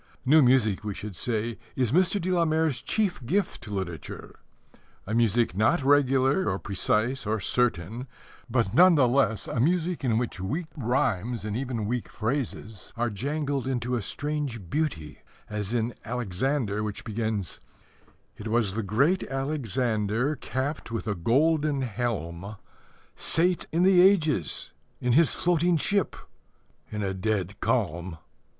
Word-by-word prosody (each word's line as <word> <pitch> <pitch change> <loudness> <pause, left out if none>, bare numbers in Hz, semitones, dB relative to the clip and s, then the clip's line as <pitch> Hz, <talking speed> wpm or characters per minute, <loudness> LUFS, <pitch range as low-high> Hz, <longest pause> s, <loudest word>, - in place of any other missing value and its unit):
New 155 +4 +6
music, 125 -7 +3
we 105 -2 -4
should 105 -2 -7
say, 115 +4 -2 0.2
is 125 -4 +1
Mr. 185 +4 +3
de 185 +1 -2
la 175 -2 +3
Mare's 155 -5 +1
chief 200 - -1
gift 185 - -1
to 105 - -9
literature 90 -6 -6 0.7
a 110 - -4
music 115 -3 +2
not 120 - +2
regular 135 +3 +3
or - - -1
precise 110 +5 -1
or 110 +1 0
certain, 115 +2 0 0.4
but 115 -5 +1
none 180 +1 +7
the 135 -4 +5
less 120 -4 +1
a - - -2
music 170 +4 +1
in 115 -4 +2
which 120 -4 -2
weak 145 - -2
rhymes 120 - -1
and 105 -1 -3
even 125 -4 -2
weak 120 +2 -2
phrases 110 -4 -4
are 120 -1 0
jangled 140 +4 -2
into 125 -1 -1
a 120 - -1
strange 135 - -4
beauty, 145 - -2 0.3
as 105 -1 -3
in 120 0 0
Alexander, 115 0 -1
which 105 -1 -4
begins: 110 -4 -3 0.8
It 105 - -7
was 110 -3 +1
the 115 - -1
Great 135 - +2
Alexander, 125 -2 -1
Capped 130 +3 -4
with 115 0 -4
a 105 - +1
golden 145 - +2
helm, 105 -5 -3 0.6
Sate 175 +2 +1
in 170 +2 +2
the 185 -1 +6
ages, 160 - +2 0.3
in 125 -1 +1
his 160 +2 +5
floating 175 0 +2
ship, 200 +6 0 0.8
In 105 -1 -3
a 95 -1 -1
dead 95 0 -2
calm. 85 +1 -1
120 Hz, 145 wpm, -27 LUFS, 105-145 Hz, 0.8 s, none